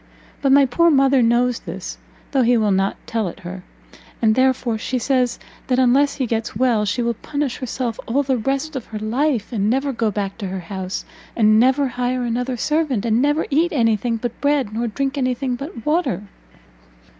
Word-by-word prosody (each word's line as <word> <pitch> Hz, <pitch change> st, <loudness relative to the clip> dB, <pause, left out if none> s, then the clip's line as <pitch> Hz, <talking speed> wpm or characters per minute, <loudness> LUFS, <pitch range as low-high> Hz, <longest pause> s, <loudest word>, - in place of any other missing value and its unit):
But 275 Hz, -, +2 dB
my 280 Hz, 0 st, +7 dB
poor 335 Hz, +7 st, +3 dB
mother 270 Hz, -3 st, +4 dB
knows 240 Hz, +1 st, +2 dB
this, 185 Hz, +1 st, -7 dB, 0.3 s
though 270 Hz, -, +2 dB
he 245 Hz, 0 st, +4 dB
will 215 Hz, -2 st, +2 dB
not 195 Hz, +1 st, +1 dB
tell 225 Hz, -3 st, -1 dB
it 170 Hz, -, -8 dB
her, 180 Hz, +1 st, -7 dB, 0.6 s
and 220 Hz, -2 st, +3 dB
therefore 255 Hz, -2 st, +1 dB
she 255 Hz, -, -2 dB
says 250 Hz, -1 st, +1 dB, 0.3 s
that 255 Hz, -, +1 dB
unless 265 Hz, +3 st, +3 dB
he 265 Hz, -, -1 dB
gets 225 Hz, -2 st, -2 dB
well, 235 Hz, -2 st, +2 dB
she 210 Hz, +4 st, -1 dB
will 235 Hz, 0 st, 0 dB
punish 285 Hz, +3 st, -3 dB
herself 250 Hz, -3 st, -3 dB
all 275 Hz, +5 st, +1 dB
the 265 Hz, -2 st, 0 dB
rest 275 Hz, +6 st, -2 dB
of 260 Hz, -, -5 dB
her 215 Hz, -, -6 dB
life, 235 Hz, +2 st, -1 dB
and 210 Hz, -2 st, +1 dB
never 270 Hz, +3 st, 0 dB
go 230 Hz, -2 st, 0 dB
back 200 Hz, 0 st, -4 dB
to 200 Hz, -, -3 dB
her 190 Hz, 0 st, -4 dB
house, 190 Hz, +1 st, -5 dB, 0.3 s
and 215 Hz, -1 st, +5 dB
never 265 Hz, +3 st, +3 dB
hire 250 Hz, 0 st, -2 dB
another 245 Hz, +2 st, -2 dB
servant, 295 Hz, -5 st, 0 dB
and 230 Hz, +1 st, +2 dB
never 295 Hz, +3 st, +2 dB
eat 325 Hz, +5 st, +2 dB
any 230 Hz, -6 st, +3 dB
thing 230 Hz, +2 st, -2 dB
but 240 Hz, +1 st, -5 dB
bread, 285 Hz, -7 st, +1 dB
nor 235 Hz, +2 st, -1 dB
drink 275 Hz, +5 st, -2 dB
any 255 Hz, -1 st, +1 dB
thing 260 Hz, 0 st, -2 dB
but 250 Hz, -3 st, -8 dB
water!" 300 Hz, -, 0 dB
245 Hz, 200 wpm, -21 LUFS, 220-270 Hz, 0.6 s, my